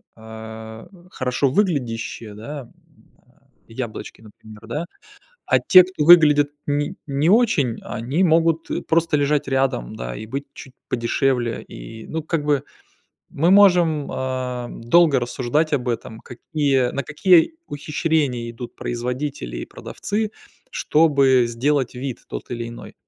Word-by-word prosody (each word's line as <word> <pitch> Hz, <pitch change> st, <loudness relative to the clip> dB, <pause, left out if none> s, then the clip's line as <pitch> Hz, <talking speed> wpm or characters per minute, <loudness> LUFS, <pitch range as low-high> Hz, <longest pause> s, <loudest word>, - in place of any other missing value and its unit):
а, 110 Hz, 0 st, -10 dB, 0.2 s
хорошо 130 Hz, +1 st, 0 dB
выглядящие, 120 Hz, -, -2 dB
да, 140 Hz, +7 st, -7 dB
м, 120 Hz, -, -15 dB, 0.6 s
а, -, -, -31 dB, 0.2 s
яблочки, 115 Hz, -1 st, -7 dB
например, 110 Hz, 0 st, -15 dB
да. 150 Hz, +9 st, -3 dB, 0.6 s
А -, -, +4 dB
те, 185 Hz, -2 st, +8 dB
кто 185 Hz, -4 st, -3 dB
выглядят 150 Hz, -4 st, +7 dB, 0.2 s
не 145 Hz, 0 st, -1 dB
не 145 Hz, +3 st, 0 dB
очень, 185 Hz, -, +3 dB
они 135 Hz, +11 st, -1 dB
могут 165 Hz, -1 st, +2 dB, 0.2 s
просто 165 Hz, -1 st, +2 dB
лежать 145 Hz, 0 st, +1 dB
рядом, 135 Hz, -, -1 dB
да, -, -, -6 dB
и 110 Hz, -, -7 dB
быть 135 Hz, +6 st, -5 dB
чуть 130 Hz, -, -12 dB, 0.2 s
подешевле. 120 Hz, 0 st, 0 dB
И 110 Hz, -1 st, -10 dB
ну 160 Hz, -1 st, -4 dB
как 160 Hz, -2 st, -2 dB
бы 145 Hz, -2 st, +1 dB, 0.7 s
мы 165 Hz, +6 st, +2 dB
можем, 175 Hz, -7 st, +4 dB
ам, 130 Hz, -2 st, -4 dB
долго 150 Hz, +2 st, +4 dB
рассуждать 130 Hz, +6 st, -1 dB
об 130 Hz, -3 st, 0 dB
этом, 110 Hz, -1 st, -4 dB
какие 135 Hz, 0 st, -1 dB
на 140 Hz, -, -3 dB
какие 170 Hz, -, +4 dB
ухищрения 145 Hz, -5 st, -1 dB
идут 120 Hz, +1 st, -9 dB
производители 125 Hz, -, -4 dB
и -, -, -6 dB
продавцы, 210 Hz, +1 st, -4 dB, 0.4 s
чтобы 140 Hz, -5 st, +3 dB
сделать 130 Hz, +3 st, 0 dB
вид 125 Hz, 0 st, -5 dB
тот -, -, -7 dB
или 120 Hz, -1 st, -4 dB
иной. 120 Hz, -, -10 dB
135 Hz, 135 wpm, -21 LUFS, 120-155 Hz, 0.7 s, те